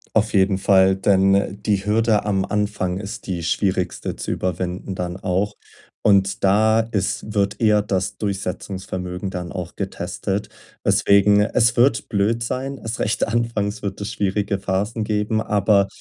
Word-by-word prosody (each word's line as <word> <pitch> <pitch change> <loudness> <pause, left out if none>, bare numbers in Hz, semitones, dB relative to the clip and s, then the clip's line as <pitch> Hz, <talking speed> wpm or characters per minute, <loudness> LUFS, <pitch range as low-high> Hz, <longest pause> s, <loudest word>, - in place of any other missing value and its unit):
Auf 110 0 +2
jeden 95 -1 +3
Fall, 95 -1 +4
denn, 95 0 +3
äh, 100 -1 0
die 100 -1 -1
Hürde 110 0 +2
am 95 -2 +1
Anfang 105 -3 -1
ist 100 0 -7
die 85 -3 -3
schwierigste 90 +1 -1
zu - - -4
überwinden 90 +1 -3
dann 90 0 -4
auch. 100 +2 -1 0.5
Und 100 -1 +3
da 110 +3 +4
ist 105 -1 -2
wird 100 0 0
eher 105 -2 +4
das 95 -2 -2
Durchsetzungsvermögen 95 -2 -4
dann 90 -2 -5
auch 90 -3 -6
getestet, 95 +1 -3 0.4
weswegen 100 +1 +4
Es 115 +2 +2
wird 125 +2 +3
blöd 110 +2 0
sein. 135 +3 -3
Erst 115 -1 -5
recht 105 - 0
anfangs 110 -2 -1
wird 100 -1 -4
es 100 - -4
schwierige 100 0 -1
Phasen 105 +4 -2
geben, 105 +1 0
aber 100 -2 +2
100 Hz, 150 wpm, -21 LUFS, 95-105 Hz, 0.5 s, Fall